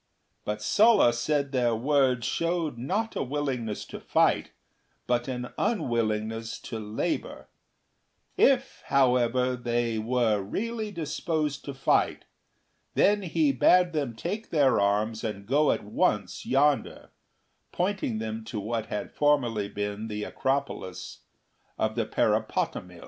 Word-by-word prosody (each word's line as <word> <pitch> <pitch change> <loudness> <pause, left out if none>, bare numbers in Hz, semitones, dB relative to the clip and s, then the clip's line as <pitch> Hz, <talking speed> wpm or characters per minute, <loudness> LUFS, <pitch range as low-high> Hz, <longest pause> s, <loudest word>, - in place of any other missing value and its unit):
But 105 0 -3
Sulla 210 - +5
said 140 +3 0
their 120 -3 +2
words 130 -1 +2
showed 170 -4 -1
not 205 - -2
a - - -1
willingness 130 -6 -3
to - - -8
fight, - - +2 0.6
but 120 0 0
an 125 -1 -4
unwillingness 115 - -1
to 115 - -6
labour; 105 0 -3 0.9
if, - - +2
however, 125 -1 +2
they 120 -2 -1
were 115 -2 +1
really 220 - -3
disposed 155 -4 -2
to 140 - -6
fight, 135 - +1 0.7
then 205 +1 +4
he 160 -5 +1
bade 175 +7 +4
them 140 -7 -2
take 205 - -4
their 140 -6 +3
arms 105 +3 +1
and 105 -3 -4
go 145 +6 +3
at - - -2
once 105 -2 -1
yonder, 140 +1 +1 0.6
pointing 185 - -1
them 110 0 -4
to 110 -1 -4
what 110 +2 -3
had 105 - -5
formerly 120 -9 +1
been 105 +2 -4
the 105 -1 -4
acropolis 135 -10 -3 0.6
of 110 0 0
Parapotamii. 110 -5 -1
125 Hz, 120 wpm, -27 LUFS, 110-150 Hz, 0.9 s, Sulla